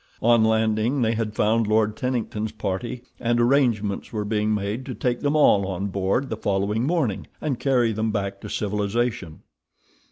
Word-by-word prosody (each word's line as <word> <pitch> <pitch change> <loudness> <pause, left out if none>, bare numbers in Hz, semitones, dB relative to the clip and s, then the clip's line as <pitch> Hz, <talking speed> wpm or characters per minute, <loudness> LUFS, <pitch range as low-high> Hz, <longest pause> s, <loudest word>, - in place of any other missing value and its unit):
On 115 -1 +5
landing 110 +3 +2
they 115 0 +2
had 110 -1 -3
found 110 +1 +2
Lord 110 0 +2
Tennington's 110 -4 -2
party, 110 +4 -4 0.2
and 120 0 +1
arrangements 120 -6 +1
were 105 -2 -3
being 105 0 0
made 105 +4 -2
to 130 - -5
take 125 -1 -1
them 145 +1 0
all 100 -10 +4
on 95 +1 -3
board 100 +8 0
the 110 - -3
following 105 +3 0
morning, 150 - -1
and 140 -6 -2
carry 125 -4 +2
them 110 +1 -1
back 100 -2 -3
to - - -7
civilization. 105 -3 -2
110 Hz, 165 wpm, -24 LUFS, 105-120 Hz, 0.2 s, On